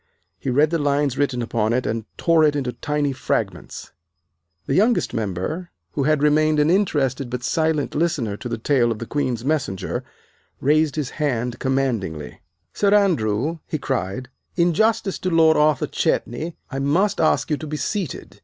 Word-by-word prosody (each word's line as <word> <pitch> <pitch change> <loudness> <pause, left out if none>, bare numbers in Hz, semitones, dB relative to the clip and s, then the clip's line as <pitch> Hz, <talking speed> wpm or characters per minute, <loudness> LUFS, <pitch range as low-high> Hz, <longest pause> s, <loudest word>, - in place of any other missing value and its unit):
He - - -3
read 145 +5 +3
the 165 - +1
lines 145 -2 +1
written 135 -4 0
upon 115 -1 0
it 125 +1 0
and 110 -1 -2
tore 165 -2 +3
it 150 -1 +3
into 130 -4 -2
tiny 145 +2 -1
fragments. 130 - -3 0.7
The - - -1
youngest 220 - +2
member, 115 - -3 0.2
who 135 - -1
had 150 -1 +2
remained 155 +1 +3
an 150 +2 +3
interested 140 -9 +1
but 125 0 -4
silent 160 +1 0
listener 150 -10 0
to 120 - -7
the - - -2
tale 120 0 +2
of 110 - -2
the 115 - -6
Queen's 125 -3 -2
Messenger, 140 -11 -1 0.6
raised 150 +1 +2
his 145 -5 -2
hand 125 -4 -1
commandingly. 120 - -2 0.3
"Sir 200 -1 +2
Andrew," 155 - +1
he 155 - -2
cried, 125 -3 -3 0.3
"in 175 -1 +3
justice 220 +1 +1
to 185 - -1
Lord 160 -2 +5
Arthur 150 -1 +3
Chetney 160 +8 -1 0.2
I 135 - -3
must 165 +9 +1
ask 155 - +2
you 150 - +2
to 155 - -7
be 150 +1 -3
seated. 190 -4 -4
145 Hz, 170 wpm, -22 LUFS, 125-160 Hz, 0.7 s, Lord